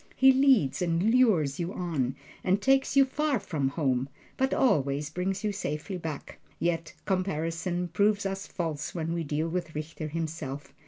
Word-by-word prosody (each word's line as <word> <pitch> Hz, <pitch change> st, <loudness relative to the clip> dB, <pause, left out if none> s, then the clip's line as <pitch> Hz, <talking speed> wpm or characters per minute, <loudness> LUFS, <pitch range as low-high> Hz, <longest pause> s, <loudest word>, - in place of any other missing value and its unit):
He 265 Hz, +1 st, +7 dB
leads 260 Hz, -, +4 dB
and 180 Hz, +5 st, +2 dB
lures 185 Hz, -, +3 dB
you 175 Hz, +2 st, -2 dB
on, 145 Hz, -8 st, -1 dB, 0.3 s
and 190 Hz, +2 st, +2 dB
takes 270 Hz, +5 st, +2 dB
you 275 Hz, -, +8 dB
far 285 Hz, -1 st, 0 dB
from 155 Hz, -8 st, -1 dB
home, 135 Hz, -3 st, 0 dB, 0.3 s
but 265 Hz, 0 st, +1 dB
always 145 Hz, -, +2 dB
brings 185 Hz, +4 st, -2 dB
you 210 Hz, -, +1 dB
safely 180 Hz, -1 st, -4 dB
back. 160 Hz, -4 st, -6 dB, 0.2 s
Yet 165 Hz, 0 st, -1 dB
comparison 175 Hz, -1 st, -1 dB
proves 200 Hz, +3 st, +2 dB
us 195 Hz, 0 st, -3 dB
false 160 Hz, -4 st, -4 dB
when 165 Hz, -1 st, -2 dB
we 170 Hz, -1 st, -1 dB
deal 150 Hz, +2 st, -1 dB
with 170 Hz, -2 st, -3 dB
Richter 155 Hz, +1 st, -5 dB
himself. 150 Hz, -3 st, -5 dB
170 Hz, 160 wpm, -28 LUFS, 150-200 Hz, 0.3 s, you